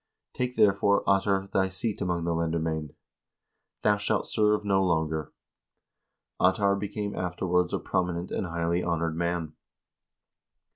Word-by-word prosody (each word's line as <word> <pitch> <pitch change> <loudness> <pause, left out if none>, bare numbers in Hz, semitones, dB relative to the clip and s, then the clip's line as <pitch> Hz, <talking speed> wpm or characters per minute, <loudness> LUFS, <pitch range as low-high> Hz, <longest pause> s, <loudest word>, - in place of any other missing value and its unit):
Take, 125 0 -2
therefore, 100 0 +3
Ottar, 95 0 +2
thy 95 0 +2
seat 100 +3 -3
among 90 -3 -1
the 85 0 0
lendermcend. 80 -2 -2 0.9
Thou 105 -1 +4
shalt 105 0 0
serve 105 -1 +1
no 95 -1 +3
longer." 80 -3 0 1.1
Ottar 100 +2 +3
became 100 +1 -4
afterwards 90 0 0
a - - 0
prominent 90 -1 -2
and 90 - -2
highly 85 +1 0
honored 85 -2 -1
man. 85 -2 -2
90 Hz, 125 wpm, -27 LUFS, 85-100 Hz, 1.1 s, Thou